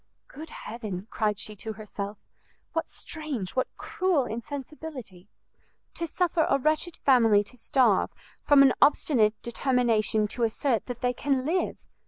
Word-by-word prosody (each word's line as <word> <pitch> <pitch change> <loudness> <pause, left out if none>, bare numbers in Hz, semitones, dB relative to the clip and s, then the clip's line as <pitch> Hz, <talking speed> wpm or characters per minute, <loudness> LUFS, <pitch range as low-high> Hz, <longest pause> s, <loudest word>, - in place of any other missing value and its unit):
"Good 310 +3 -10
heaven," 210 -8 -6
cried 210 -3 0
she 210 +1 -4
to 220 +2 -5
herself, 205 -1 -6 0.6
"what 325 - -2
strange, 290 - -5
what 260 - +1
cruel 360 -8 0
insensibility! 255 - -7 0.6
to 335 - -3
suffer 340 0 +1
a 275 - +4
wretched 310 +4 0
family 225 -6 +4
to 205 - -11
starve, 240 -4 +2 0.3
from 285 -1 +6
an 265 -2 +5
obstinate 225 -7 +4
determination 235 -4 +1
to 240 - -5
assert 230 0 0
that 245 -2 -6
they 250 0 +1
can 265 0 0
live! 350 +4 -1
250 Hz, 140 wpm, -27 LUFS, 215-290 Hz, 0.6 s, from